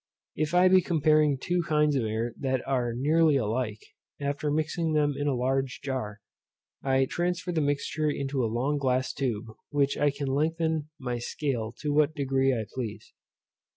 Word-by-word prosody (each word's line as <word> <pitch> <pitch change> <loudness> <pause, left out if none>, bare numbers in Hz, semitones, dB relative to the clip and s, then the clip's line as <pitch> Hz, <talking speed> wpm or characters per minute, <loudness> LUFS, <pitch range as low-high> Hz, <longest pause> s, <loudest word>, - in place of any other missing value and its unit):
If 155 +2 -1
I 180 +1 +6
be 185 0 +6
comparing 155 -4 +3
two 175 +6 0
kinds 150 -3 +2
of 125 -4 +1
air 110 +2 -2
that 130 -2 -1
are 125 -3 0
nearly 150 +5 +3
alike, 110 -2 -1 0.4
after 145 +1 -2
mixing 155 +2 0
them 145 -1 +2
in 145 +1 -2
a 140 - +1
large 130 +2 -1
jar, 110 -7 -4 0.6
I 135 0 +2
transfer 180 +4 -2
the 165 -2 0
mixture 145 +1 0
into 135 -2 -1
a 115 - 0
long 135 +6 0
glass 130 -1 0
tube, 120 -5 -2
by 110 - -12 0.2
which 140 -1 +1
I 145 - +4
can 140 0 -4
lengthen 160 +2 0
my 125 -3 -3
scale 120 -3 -3
to 150 -1 -1
what 155 +1 +3
degree 135 -2 +1
I 115 -4 -1
please. 120 -5 -6
140 Hz, 175 wpm, -28 LUFS, 130-155 Hz, 0.6 s, I